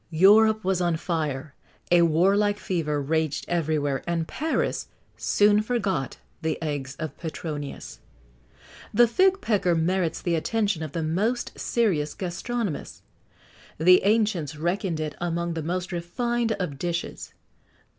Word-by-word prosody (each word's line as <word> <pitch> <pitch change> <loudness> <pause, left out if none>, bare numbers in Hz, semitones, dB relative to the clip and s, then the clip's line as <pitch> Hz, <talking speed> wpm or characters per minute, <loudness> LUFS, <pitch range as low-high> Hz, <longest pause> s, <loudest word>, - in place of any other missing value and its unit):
Europe 215 +6 +5
was 190 -1 +1
on 175 -2 +1
fire; 155 -5 -3 0.4
a 175 -1 +6
warlike 195 +6 +3
fever 160 -7 -1
raged 155 0 -1
everywhere; 155 -5 0
and 165 -2 -1
Paris 315 +2 -1 0.3
soon 205 0 +3
forgot 200 - -1 0.2
the 160 -1 -1
eggs 145 -4 -4
of 155 -3 -5
Petronius. 155 -3 -6 0.9
The 240 +3 +5
fig 380 - +3
pecker 190 -6 +1
merits 170 +1 0
the 175 - -1
attention 200 +1 0
of 155 -2 -5
the 165 - -2
most 205 +10 0
serious 175 -11 0
gastronomists. 195 +1 -4 0.7
The 180 +3 +6
ancients 200 -8 +1
reckoned 175 +1 -1
it 155 -1 -3
among 170 0 -1
the 165 - -3
most 180 +4 -3
refined 230 +7 -1
of 170 -9 -4
dishes. 175 0 -4
175 Hz, 125 wpm, -25 LUFS, 155-205 Hz, 0.9 s, a